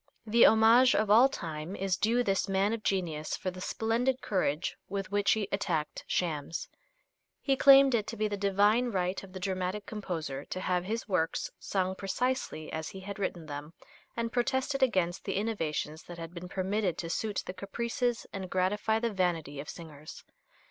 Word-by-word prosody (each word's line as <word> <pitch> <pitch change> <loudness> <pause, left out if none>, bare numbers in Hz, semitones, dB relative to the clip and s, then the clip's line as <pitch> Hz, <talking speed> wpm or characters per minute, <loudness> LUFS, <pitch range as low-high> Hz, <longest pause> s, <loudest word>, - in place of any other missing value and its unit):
The 230 +2 +6
homage 225 +3 +6
of 210 -1 +2
all 240 +5 +7
time 160 - -5
is 195 -2 0
due 235 +5 +2
this 195 -2 0
man 195 +3 +2
of 230 - -3
genius 165 -7 -1
for 185 - -3
the 185 0 -9
splendid 235 +6 0
courage 180 - -1
with 195 -1 -4
which 205 0 +3
he 215 -3 -1
attacked 165 -6 -2
shams. 160 -3 -2 0.7
He 275 - +1
claimed 275 -1 +7
it 215 -3 +1
to 230 - -5
be 215 0 +1
the 205 - -2
divine 205 +4 +3
right 185 -4 -1
of 195 - -12
the 185 - -7
dramatic 185 +2 -2
composer 165 -10 -4
to 185 - -5
have 180 -1 0
his 225 +3 -3
works 175 -5 0
sung 190 -1 -1
precisely 195 -3 -2
as 160 0 -3
he 190 - -9
had 200 +1 -7
written 175 -4 -3
them, 145 +1 -7 0.4
and 230 0 -1
protested 265 +3 0
against 185 -9 +1
the - - -2
innovations 165 -7 -2
that 175 - -9
had 165 0 -7
been 180 0 -8
permitted 190 0 -1
to 165 - -4
suit 205 +5 -2
the 180 - -5
caprices 235 +5 -2
and 190 -2 -5
gratify 205 +4 +1
the 230 -1 -1
vanity 165 -6 -1
of 145 - -6
singers. 155 -3 -10
195 Hz, 180 wpm, -30 LUFS, 175-220 Hz, 0.7 s, all